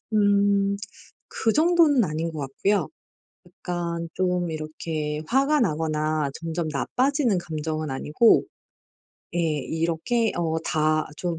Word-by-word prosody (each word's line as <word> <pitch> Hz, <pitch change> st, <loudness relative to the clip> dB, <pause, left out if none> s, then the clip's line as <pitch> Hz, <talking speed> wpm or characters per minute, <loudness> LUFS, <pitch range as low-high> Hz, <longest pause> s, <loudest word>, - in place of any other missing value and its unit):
음 200 Hz, -1 st, +3 dB, 0.6 s
그 225 Hz, -, +2 dB
정도는 315 Hz, -5 st, +4 dB
아닌 160 Hz, 0 st, -2 dB
것 160 Hz, -, -7 dB
같고요. 165 Hz, +9 st, 0 dB, 0.6 s
약간 170 Hz, -2 st, -4 dB
좀 180 Hz, -2 st, 0 dB
이렇게 155 Hz, -1 st, -4 dB
화가 275 Hz, -, +3 dB
나거나 155 Hz, -4 st, 0 dB
점점 165 Hz, 0 st, -3 dB
나빠지는 245 Hz, -, +1 dB
감정은 155 Hz, -2 st, -3 dB
아니고 150 Hz, -, +3 dB, 0.9 s
예 -, -, +1 dB
이렇게 165 Hz, -, 0 dB
어 160 Hz, -2 st, 0 dB
다 155 Hz, -1 st, +1 dB
좀 175 Hz, -1 st, -3 dB
170 Hz, 215 characters per minute, -25 LUFS, 155-205 Hz, 0.9 s, 정도는